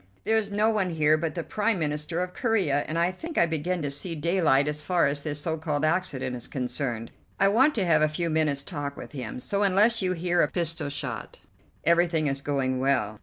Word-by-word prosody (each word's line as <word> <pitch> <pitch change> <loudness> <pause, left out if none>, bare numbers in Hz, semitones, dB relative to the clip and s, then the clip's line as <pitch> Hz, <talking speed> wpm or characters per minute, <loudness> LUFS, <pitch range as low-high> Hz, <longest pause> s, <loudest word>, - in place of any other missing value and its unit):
There 220 - +2
is 205 -2 -4
no 210 +2 +2
one 200 -4 0
here 155 -2 +3
but 155 -1 -3
the 170 - -3
Prime 215 +3 0
Minister 150 +2 -2
of 180 0 -4
Corea, 190 - +1
and 155 - -3
I 170 +2 +2
think 320 - -8
I - - +5
begin 170 +1 -2
to 145 - -2
see 165 +5 -1
daylight 160 -4 +2
so 150 0 -3
far 180 0 +2
as 145 +1 0
this 150 -1 -3
so 160 +1 -2
called 150 -1 -1
accident 150 -7 0
is 120 - -7
concerned. 125 -3 -3 0.3
I 195 - +5
want 265 +9 +4
to 200 -5 +1
have 155 -3 +4
a 155 - +4
few 165 +2 -2
minutes' 150 -3 +1
talk 145 -3 -5
with - - -9
him, 125 -5 -6
so, 200 +10 -1
unless 205 +4 +3
you 185 -1 0
hear 175 0 +1
a - - +3
pistol 165 -4 -1
shot, 140 -5 -5 0.5
everything 170 -1 +3
is 135 -1 -1
going 135 -3 -1
well." 125 -6 0
160 Hz, 220 wpm, -26 LUFS, 145-185 Hz, 0.5 s, I